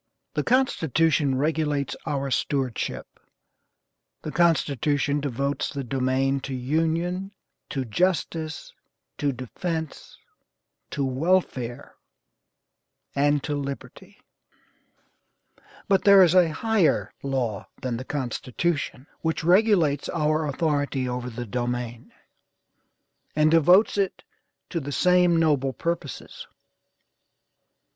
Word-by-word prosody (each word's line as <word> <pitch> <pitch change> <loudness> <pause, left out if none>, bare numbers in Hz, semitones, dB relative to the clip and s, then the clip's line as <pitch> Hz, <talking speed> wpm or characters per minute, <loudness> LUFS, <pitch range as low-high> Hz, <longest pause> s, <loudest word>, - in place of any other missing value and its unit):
The - - 0
Constitution 160 - +2
regulates 150 -1 0
our 140 -1 -2
stewardship; 130 -3 -2 1.0
the 155 - -4
Constitution 145 -4 +1
devotes 140 0 -2
the 140 -1 -4
domain 130 +2 0
to 135 0 -5
union, 165 +8 -1 0.4
to 135 -2 -2
justice, 160 - -1 0.5
to 145 -1 +1
defence, 160 +5 -5 0.7
to 140 - -2
welfare, 130 -4 -1 1.2
and 145 0 +2
to 150 - -2
liberty." 140 -1 -7 1.7
"But 195 -1 +3
there 200 -1 +8
is 175 -2 +4
a 180 -3 +5
higher 220 -2 +1
law 125 -7 -2
than 125 -3 -3
the 130 - -5
Constitution, 135 +2 -2 0.2
which 160 0 -1
regulates 175 -6 +3
our 155 -1 0
authority 145 -2 0
over 125 0 -3
the 120 +1 -6
domain, 120 0 -4 1.2
and 155 0 +4
devotes 180 +6 +5
it 195 -2 -1 0.5
to 170 - -1
the 145 -1 -6
same 180 +1 +4
noble 145 -5 +2
purposes. 165 0 -5
145 Hz, 95 wpm, -25 LUFS, 130-165 Hz, 1.7 s, there